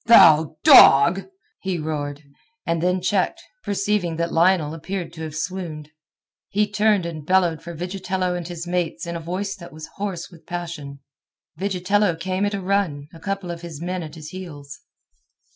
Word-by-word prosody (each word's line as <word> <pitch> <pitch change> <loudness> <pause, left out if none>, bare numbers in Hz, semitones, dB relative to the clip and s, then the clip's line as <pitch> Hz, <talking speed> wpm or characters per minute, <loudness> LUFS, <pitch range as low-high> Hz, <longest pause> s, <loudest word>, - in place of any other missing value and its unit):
"Thou 160 -9 +7
dog!" 170 +8 +8 0.3
he 190 -2 -2
roared, 150 -2 -4 0.4
and 165 -2 0
then 180 +1 +1
checked, 200 - +1 0.2
perceiving 200 -4 0
that 170 +1 -2
Lionel 165 -2 +3
appeared 175 +3 -5
to 160 - -9
have 155 -1 -5
swooned. 160 -2 -5 0.6
He 210 +1 +2
turned 210 -3 +2
and 160 -3 -5
bellowed 175 -1 +2
for 170 0 -8
Vigitello 185 +1 -2
and 175 -2 -4
his 175 -1 -6
mates 175 0 -2
in 170 0 -4
a - - -3
voice 185 +4 -3
that 170 -2 -11
was 155 0 -10
hoarse 195 -3 -4
with 165 -2 -17
passion. 160 -6 -6 0.6
Vigitello 195 0 +1
came 185 +4 -1
at 205 - -2
a 195 - -4
run, 180 -7 -1
a 165 - -12
couple 195 -1 -3
of 170 -1 -7
his 165 -4 -8
men 180 +2 -3
at 155 -1 -8
his 155 -1 -9
heels. 145 -7 -9
175 Hz, 170 wpm, -23 LUFS, 160-190 Hz, 0.6 s, dog